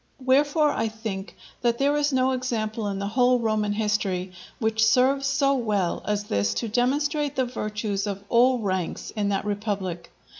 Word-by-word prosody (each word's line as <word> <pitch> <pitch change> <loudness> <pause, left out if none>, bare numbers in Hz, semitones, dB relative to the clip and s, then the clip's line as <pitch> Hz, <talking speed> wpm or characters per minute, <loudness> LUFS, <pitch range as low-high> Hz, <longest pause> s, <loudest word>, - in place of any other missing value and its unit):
Wherefore, 290 +3 +3
I 225 - -1
think, 215 -3 -6 0.3
that 235 -1 +1
there 280 +2 +2
is 295 0 +1
no 260 0 +2
example 230 -4 -2
in 200 -1 -2
the 200 - -3
whole 250 +2 +3
Roman 215 -3 0
history 205 -4 -1 0.3
which 220 -1 +1
serves 265 +4 +3
so 275 0 +2
well 210 -8 0
as 210 -1 0
this 100 - 0
to 230 - -2
demonstrate 285 +5 0
the 260 - +1
virtues 210 -4 -3
of 200 -1 -4
all 250 +3 +4
ranks 190 -6 -3
in 205 -2 0
that 195 0 -1
republic. 200 -4 -3
220 Hz, 165 wpm, -25 LUFS, 205-260 Hz, 0.3 s, all